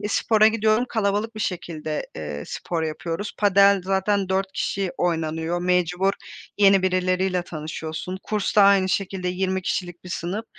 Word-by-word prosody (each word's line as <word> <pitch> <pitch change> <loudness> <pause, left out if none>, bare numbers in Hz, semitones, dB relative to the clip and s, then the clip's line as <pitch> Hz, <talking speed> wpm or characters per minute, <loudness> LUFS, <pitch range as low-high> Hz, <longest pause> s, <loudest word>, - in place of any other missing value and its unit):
Eee, 205 - -3
spora 215 +1 +3
gidiyorum, 220 +1 +2
kalabalık 215 +1 -1
bir 215 - -6
şekilde, 160 -5 -3
eee, 75 -1 -5
spor 170 -2 -4
yapıyoruz. 165 +5 -4
Padel 200 -1 +5
zaten 195 0 0
4 190 0 -1
kişi 195 -2 -2
oynanıyor. 165 0 -1
Mecbur 180 +2 +1 0.5
yeni 195 -2 +5
birileriyle 185 0 +1
tanışıyorsun. 160 +3 -6
Kursta 210 -1 +2
aynı 195 -1 +5
şekilde 190 -1 -2
20 190 +1 -1
kişilik 175 -1 -3
bir - - -9
sınıf. 180 +5 -4
185 Hz, 140 wpm, -23 LUFS, 175-200 Hz, 0.5 s, Padel